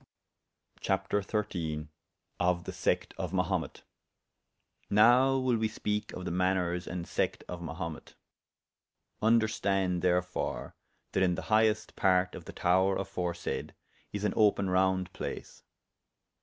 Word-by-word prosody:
CHAPTER 95 +1 0
XIII.Of 85 -2 -3
the - - -5
Secte - - -1
of 90 -2 -3
Mahumet. 90 -2 -1 1.1
Now 125 +6 +5
will 130 -2 +2
we 110 0 +1
speake 105 -1 -3
of 90 - -6
the - - -2
maners 90 -1 0
and 85 -1 -4
sect - - -1
of 90 -1 -6
Mahumet. 85 -1 -6 1.1
Vnderstande, 100 -5 +2
therefore, 90 0 -1 0.4
that 95 - 0
in 90 -2 +3
the - - -5
highest 110 0 +2
part 90 -1 +3
of - - -9
the - - -7
tower 95 +2 +3
aforesayde, 90 -3 -3 0.4
is 100 0 -4
an 105 - +1
open 100 -3 +3
round 95 -1 +2
place. - - -6
95 Hz, 120 wpm, -30 LUFS, 90-105 Hz, 1.1 s, Now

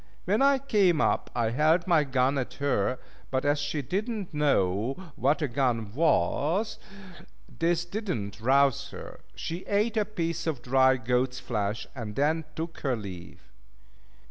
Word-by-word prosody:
When 205 +6 +2
I 275 0 +5
came 205 - +2
up - - +1
I 115 -2 +1
held 155 +7 +3
my 170 -4 +4
gun 135 0 +1
at 130 - -4
her, 130 -4 0 0.3
but 130 +1 -1
as 145 +1 +2
she 145 0 -2
did 200 - -2
not 210 -7 -5
know 120 -5 +1 0.2
what 140 +5 +1
a - - +1
gun 120 -5 -1
was, 160 - +1 0.8
this 170 +1 +1
did 210 +5 -5
not 100 - -3
rouse 135 +1 +3
her. - - -10 0.2
She 165 +2 -4
ate 210 +3 +1
a 210 - +2
piece 170 -6 -3
of 140 -7 -2
dry 130 +1 +4
goat's 125 +2 0
flesh, 105 -3 -2
and 115 -6 -6
then 155 +3 +1
took 165 +1 -5
her 135 -3 0
leave. 95 -6 -9
140 Hz, 160 wpm, -28 LUFS, 125-170 Hz, 0.8 s, I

